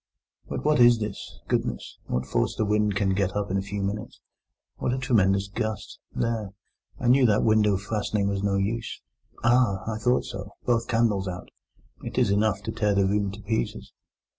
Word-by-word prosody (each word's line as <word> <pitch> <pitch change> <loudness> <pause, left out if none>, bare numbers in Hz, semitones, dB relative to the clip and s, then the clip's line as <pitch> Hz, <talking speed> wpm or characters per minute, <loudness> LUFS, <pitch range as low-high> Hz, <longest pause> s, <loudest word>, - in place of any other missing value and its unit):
'But - - -4
what 150 -2 +3
is 120 -1 +7
this? 105 -2 -6
Goodness! - - -2
what 65 +1 -1
force - - 0
the 110 - 0
wind 105 -1 +1
can 100 -2 +1
get 95 0 0
up 105 -2 -2
in 95 - +1
a - - 0
few 100 0 -4
minutes! 100 +2 -4 0.6
What 125 - -1
a - - -1
tremendous 100 -7 +2
gust! 110 0 -4
There! 110 -4 -2 0.5
I 125 - -1
knew 130 +1 +6
that 105 -1 +3
window 105 -2 +3
fastening 105 0 -1
was 100 -1 -1
no 100 -1 +1
use! 110 +4 -2 0.4
Ah! 120 -6 +3
I 110 -1 -3
thought 125 +3 +2
so—both 115 -1 -3
candles 115 -5 +1
out. 90 0 -6 0.5
It - - -7
is 100 - +3
enough 100 -1 +1
to 110 - -3
tear 105 -3 +1
the 100 -1 +3
room 100 +1 +1
to 105 +1 -10
pieces. 110 +2 -3
105 Hz, 185 wpm, -26 LUFS, 100-115 Hz, 0.6 s, is